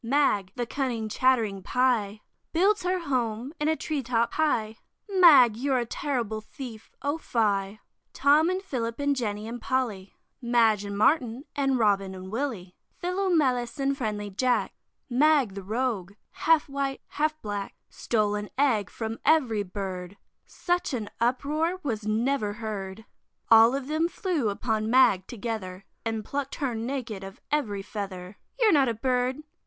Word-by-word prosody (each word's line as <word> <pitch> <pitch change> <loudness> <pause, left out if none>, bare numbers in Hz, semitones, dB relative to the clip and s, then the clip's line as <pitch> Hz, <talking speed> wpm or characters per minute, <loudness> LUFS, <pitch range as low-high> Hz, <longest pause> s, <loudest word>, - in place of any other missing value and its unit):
Mag, 230 -7 +2
the 245 - -2
cunning 240 -3 -2
chattering 220 -4 +1
Pie, 220 -4 +1 0.3
Builds 395 +5 +3
her 365 +1 0
home 250 -3 -2
in 300 - 0
a 315 - +3
tree 305 -2 -3
top 235 -2 0
high, 225 -9 0 0.3
Mag, 315 - +7
you're 265 +3 0
a 240 - 0
terrible 230 -4 -2
thief, 225 -1 -9
O 285 +3 -1
fie! 205 -5 0 0.3
Tom 300 +4 +4
and 370 +1 -2
Philip 235 -8 -3
and 285 0 +1
Jenny 215 -4 -3
and 235 +1 -6
Polly, 220 -7 -2 0.3
Madge 230 -4 +3
and 200 0 -5
Martin 255 +2 +2
and 270 -2 +1
Robin 195 -4 +1
and 185 0 -9
Willy, 220 -8 -3 0.3
Philomelus 315 -10 0
and 275 0 +1
friendly 210 -5 -3
Jack, 250 +5 +1 0.3
Mag 275 -3 +3
the 195 - -6
rogue, 210 -2 -2 0.2
half 325 -1 +2
white, 275 -1 -3
half 310 +1 -1
black, 205 -2 -4
Stole 210 -3 0
an 210 0 -3
egg 235 -9 +2
from 225 0 -5
every 255 -10 +3
Bird; 190 -1 -6 0.3
Such 355 -5 -1
an 215 -4 -5
uproar 300 +9 0
was 220 -6 -3
never 220 0 0
heard; 210 -2 -6 0.5
All 225 +3 +8
of 275 -1 -3
them 310 +2 +1
flew 340 - -1
upon 220 +1 -1
Mag 225 -7 +4
together, 200 -5 -5 0.2
And 225 -2 -3
pluck'd 280 -1 -3
her 270 -4 -2
naked 225 -3 -4
of 195 0 -9
every 215 -10 -1
feather. 195 -2 -7 0.2
"You're 445 -5 +5
not 275 -4 +4
a 230 - -2
Bird!" 255 +4 0
235 Hz, 150 wpm, -27 LUFS, 210-280 Hz, 0.5 s, All